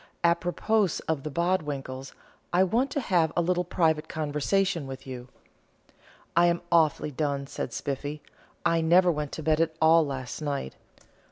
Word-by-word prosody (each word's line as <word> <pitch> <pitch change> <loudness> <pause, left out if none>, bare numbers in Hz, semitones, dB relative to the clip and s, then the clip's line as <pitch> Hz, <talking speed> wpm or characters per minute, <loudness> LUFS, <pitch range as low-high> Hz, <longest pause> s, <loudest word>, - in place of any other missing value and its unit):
Apropos 175 +3 +1
of 160 -3 0
the 155 - -5
Bodwinkles, 145 -6 -2 0.4
I 180 +2 +4
want 235 +9 +1
to 275 - -2
have 175 - +2
a - - +4
little 180 +1 +1
private 160 -3 +1
conversation 160 +3 0
with 135 0 -8
you." 125 -2 -7 1.1
"I 170 +1 +5
am 170 0 0
awfully 155 -2 +3
done," 140 -1 -2
said - - -5
Spiffy. 145 +2 -4 0.4
"I 165 0 +3
never 175 +2 +5
went 150 -2 -3
to 160 - -5
bed 155 +1 +2
at 160 -1 0
all 160 +1 +6
last 135 -1 -5
night. 140 - -3
160 Hz, 155 wpm, -27 LUFS, 145-175 Hz, 1.1 s, all